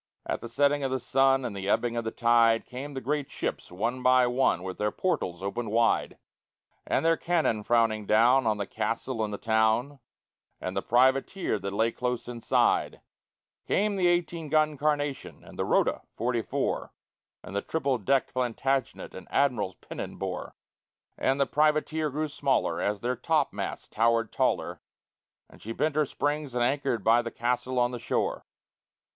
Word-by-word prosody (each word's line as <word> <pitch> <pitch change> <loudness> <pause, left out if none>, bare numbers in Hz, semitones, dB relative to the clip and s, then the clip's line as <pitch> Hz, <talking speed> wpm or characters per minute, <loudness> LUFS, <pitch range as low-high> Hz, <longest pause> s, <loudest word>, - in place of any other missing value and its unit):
At - - -3
the 115 - -7
setting 145 +3 +2
of 135 - 0
the 130 0 -1
sun 135 +1 +2
and 110 -4 -4
the 95 0 -4
ebbing 120 +2 +1
of 115 - -1
the 110 - -2
tide 115 -1 +3
Came 135 +3 -7
the 135 - -4
great 145 +2 -2
ships - - -4
one 115 +8 -2
by 130 0 +5
one, 125 -7 +1
with 95 -1 -6
their 105 0 +1
portals 95 - -2
opened 110 +3 -3
wide, 115 +2 +1 0.7
And - - +1
their 165 0 +5
cannon 165 -11 +1
frowning 110 -2 +1
down 120 +3 +4
on 110 -1 +2
the 100 - -2
castle 115 +3 -2
and 105 - -3
the 100 - -4
town 110 +6 +1 0.6
And 95 - -5
the 100 - 0
privateer 130 - +2
that 100 0 -4
lay 110 +3 +2
close 125 -1 -3
inside; 120 -1 +1 0.7
Came 205 +1 +1
the 185 -2 +2
eighteen 170 -2 0
gun 155 0 +2
Carnation, 145 -1 -2
and - - -14
the - - 0
Rota, - - +2
forty 120 +1 0
four, - - -2 0.5
And 95 - -9
the 100 - 0
triple 140 -6 -1
decked 135 +5 +1
Plantagenet 130 +2 -1
an - - -10
Admiral's 115 -9 +1
pennon - - -7
bore: - - -5 0.6
And 135 +1 0
the 140 - +4
privateer 155 +2 +1
grew 155 +3 -2
smaller 140 -2 0
as 100 -1 -1
their 125 +1 -1
topmasts 155 -2 -1
towered 115 0 +1
taller, - - -1 0.7
And - - -18
she 115 - -5
bent 155 +4 0
her 155 -1 +3
springs 145 -2 -2
and 120 - +2
anchored 125 -4 0
by 115 +3 +5
the 120 - -5
castle 125 +2 -2
on 120 0 +2
the 120 - -5
shore. 115 - -2
125 Hz, 175 wpm, -28 LUFS, 115-145 Hz, 0.7 s, by